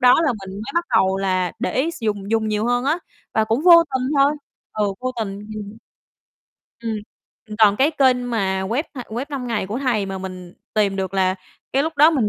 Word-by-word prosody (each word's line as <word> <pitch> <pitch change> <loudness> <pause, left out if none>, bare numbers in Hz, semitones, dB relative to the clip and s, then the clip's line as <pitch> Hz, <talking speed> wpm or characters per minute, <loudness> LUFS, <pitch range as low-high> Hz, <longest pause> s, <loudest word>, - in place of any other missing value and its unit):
đó 250 0 +7
là 280 - +2
mình 190 - -8
mới 215 +7 -6
bắt 340 0 +1
đầu 190 -2 +3
là 185 -2 0
để 250 - -2
ý 290 +6 +1
s 335 - -10
dùng 205 -2 -2
dùng 220 -1 +1
nhiều 215 +1 0
hơn 245 +1 +1
á, 305 +5 +1 0.4
và 220 - +3
cũng 225 +6 0
vô 340 -2 +9
tình 255 0 0
thôi 280 +1 +5 0.4
ừ, 210 -1 0
vô 255 0 -2
tình. 200 -3 -3 0.2
Ừm. 210 0 -7 1.0
Ừm. 230 -1 -3 0.5
Ừm, 210 -1 -7
còn 210 -2 +6
cái 275 +6 +3
kênh 255 -4 +2
mà 190 -4 0
web, 230 +9 0
a, 255 - -6
Web5Ngay 245 -3 -3
của 215 +5 -3
thầy 240 -7 0
mà 195 0 -4
mình 185 -2 -8 0.2
tìm 205 -3 +2
được 190 -1 -3
là 185 -1 +2 0.4
cái 270 - +3
lúc 320 +1 -3
đó 300 +3 +7
mình 260 -10 +1
225 Hz, 215 wpm, -21 LUFS, 195-260 Hz, 1.0 s, vô